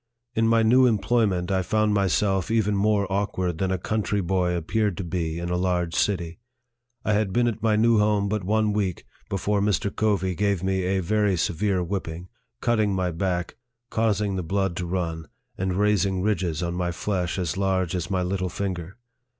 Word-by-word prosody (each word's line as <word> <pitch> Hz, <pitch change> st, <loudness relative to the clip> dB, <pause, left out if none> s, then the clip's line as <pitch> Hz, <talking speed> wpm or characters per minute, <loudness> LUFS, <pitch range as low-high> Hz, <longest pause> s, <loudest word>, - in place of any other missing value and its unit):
In 115 Hz, -1 st, +2 dB
my 115 Hz, 0 st, +4 dB
new 125 Hz, +3 st, +5 dB
employment, 105 Hz, -5 st, +1 dB
I 95 Hz, -1 st, +2 dB
found 110 Hz, +3 st, +1 dB
myself 95 Hz, -1 st, +1 dB
even 110 Hz, -2 st, +2 dB
more 100 Hz, 0 st, +2 dB
awkward 95 Hz, -4 st, -1 dB
than 95 Hz, -, 0 dB
a 95 Hz, -, 0 dB
country 105 Hz, +2 st, -1 dB
boy 90 Hz, -1 st, 0 dB
appeared 100 Hz, +3 st, 0 dB
to 100 Hz, -, -3 dB
be 85 Hz, -1 st, -2 dB
in 85 Hz, +1 st, -3 dB
a -, -, +1 dB
large 90 Hz, -2 st, 0 dB
city. 90 Hz, -2 st, -1 dB, 0.7 s
I 105 Hz, -, +2 dB
had 105 Hz, -2 st, +1 dB
been 120 Hz, +4 st, +2 dB
at 110 Hz, -2 st, -2 dB
my 110 Hz, -1 st, +2 dB
new 115 Hz, +1 st, +4 dB
home 105 Hz, -1 st, +2 dB
but 105 Hz, -1 st, -1 dB
one 105 Hz, +2 st, +1 dB
week 100 Hz, -4 st, -2 dB, 0.2 s
before 100 Hz, +1 st, 0 dB
Mr. 100 Hz, -1 st, 0 dB
Covey 100 Hz, -4 st, +1 dB
gave 100 Hz, -1 st, 0 dB
me 95 Hz, -1 st, 0 dB
a 95 Hz, +1 st, +1 dB
very 105 Hz, +1 st, +1 dB
severe 95 Hz, +1 st, 0 dB
whipping, 90 Hz, -1 st, -4 dB, 0.3 s
cutting 110 Hz, -4 st, +2 dB
my 90 Hz, -1 st, 0 dB
back, 90 Hz, +2 st, -2 dB, 0.3 s
causing 105 Hz, -3 st, +1 dB
the -, -, -1 dB
blood 95 Hz, +1 st, -1 dB
to 90 Hz, -, -3 dB
run, 85 Hz, -3 st, -3 dB, 0.3 s
and 95 Hz, -1 st, -2 dB
raising 100 Hz, -2 st, +2 dB
ridges 90 Hz, -6 st, 0 dB
on 85 Hz, 0 st, -2 dB
my 90 Hz, 0 st, -1 dB
flesh 90 Hz, +1 st, -2 dB
as 90 Hz, -6 st, -1 dB
large 95 Hz, -2 st, 0 dB
as 90 Hz, -1 st, -3 dB
my 95 Hz, -1 st, 0 dB
little 95 Hz, 0 st, -1 dB
finger. 90 Hz, 0 st, -4 dB
95 Hz, 185 wpm, -25 LUFS, 90-105 Hz, 0.7 s, new